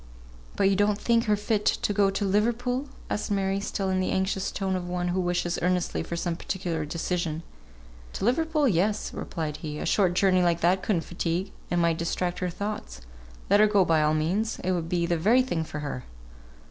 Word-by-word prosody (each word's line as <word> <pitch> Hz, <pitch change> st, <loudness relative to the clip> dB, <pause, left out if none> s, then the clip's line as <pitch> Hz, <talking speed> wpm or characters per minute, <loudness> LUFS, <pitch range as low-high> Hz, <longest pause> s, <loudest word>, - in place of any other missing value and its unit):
"But 195 Hz, -, +3 dB
you 195 Hz, -, +3 dB
don't 205 Hz, +1 st, +2 dB
think 230 Hz, +1 st, +2 dB
her 210 Hz, -2 st, +3 dB
fit 210 Hz, 0 st, -1 dB
to 205 Hz, -, +1 dB
go 200 Hz, -1 st, +3 dB
to 195 Hz, +1 st, -1 dB
Liverpool?" 240 Hz, +7 st, 0 dB, 0.2 s
asked 210 Hz, -, -2 dB
Mary, 195 Hz, -1 st, 0 dB
still 195 Hz, -1 st, -2 dB
in 185 Hz, -, +1 dB
the 185 Hz, -, 0 dB
anxious 190 Hz, 0 st, 0 dB
tone 190 Hz, -1 st, -1 dB
of 180 Hz, -1 st, -4 dB
one 180 Hz, 0 st, -1 dB
who 180 Hz, +1 st, 0 dB
wishes 175 Hz, -1 st, -1 dB
earnestly 180 Hz, 0 st, 0 dB
for 170 Hz, -, -4 dB
some 170 Hz, 0 st, -2 dB
particular 170 Hz, -3 st, -3 dB
decision. 165 Hz, 0 st, -2 dB, 0.7 s
"To -, -, -3 dB
Liverpool 305 Hz, +4 st, +2 dB
yes," 205 Hz, +1 st, +1 dB
replied 155 Hz, -3 st, -4 dB
he. 150 Hz, -1 st, -6 dB
"A -, -, -4 dB
short 185 Hz, -4 st, +2 dB
journey 185 Hz, -1 st, +4 dB
like 170 Hz, -1 st, +2 dB
that 180 Hz, +3 st, +3 dB
could 210 Hz, -, +1 dB
not 165 Hz, -, -2 dB
fatigue, 175 Hz, +2 st, -2 dB, 0.2 s
and 175 Hz, -, +1 dB
might 170 Hz, -1 st, +2 dB
distract 175 Hz, +1 st, -1 dB
her 180 Hz, -, -1 dB
thoughts. 190 Hz, -, -5 dB, 0.5 s
Let 200 Hz, +1 st, +4 dB
her 215 Hz, -, +7 dB
go 205 Hz, -3 st, +4 dB
by 160 Hz, -2 st, +3 dB
all 155 Hz, +1 st, +2 dB
means, 190 Hz, +9 st, 0 dB
it 185 Hz, -, +1 dB
would 170 Hz, -3 st, -1 dB
be 170 Hz, -1 st, +1 dB
the 170 Hz, 0 st, +1 dB
very 230 Hz, +9 st, +4 dB
thing 175 Hz, -11 st, -1 dB
for 150 Hz, -1 st, -6 dB
her." 140 Hz, -4 st, -4 dB
185 Hz, 210 wpm, -27 LUFS, 170-205 Hz, 0.7 s, her